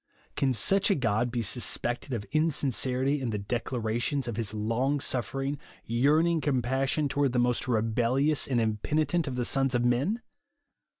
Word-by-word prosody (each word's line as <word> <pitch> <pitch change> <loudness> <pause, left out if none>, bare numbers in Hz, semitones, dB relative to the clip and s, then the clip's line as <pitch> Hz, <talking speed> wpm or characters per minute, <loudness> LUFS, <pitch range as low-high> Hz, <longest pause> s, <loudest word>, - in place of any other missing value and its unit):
Can 135 - +1
such 195 - +2
a 200 - +4
God 115 -2 0
be 120 -1 -2
suspected 120 +3 -1
of 110 -5 -3
insincerity 140 -3 +1
in 125 - -2
the 105 - -2
declarations 120 +4 -2
of 120 - -3
his 110 -3 -2
long 115 +7 0
suffering, 135 +4 -2 0.3
yerarn 145 +8 +3
ing 170 -2 +1
compassion 135 +2 0
toward 140 -2 0
the - - 0
most 120 0 +1
rebellious 125 +5 +1
and 125 -3 +1
impenitent 145 +9 0
of 130 - -3
the 125 -1 -1
sons 135 0 +1
of 120 0 +1
men 145 - +1
130 Hz, 160 wpm, -28 LUFS, 115-145 Hz, 0.3 s, a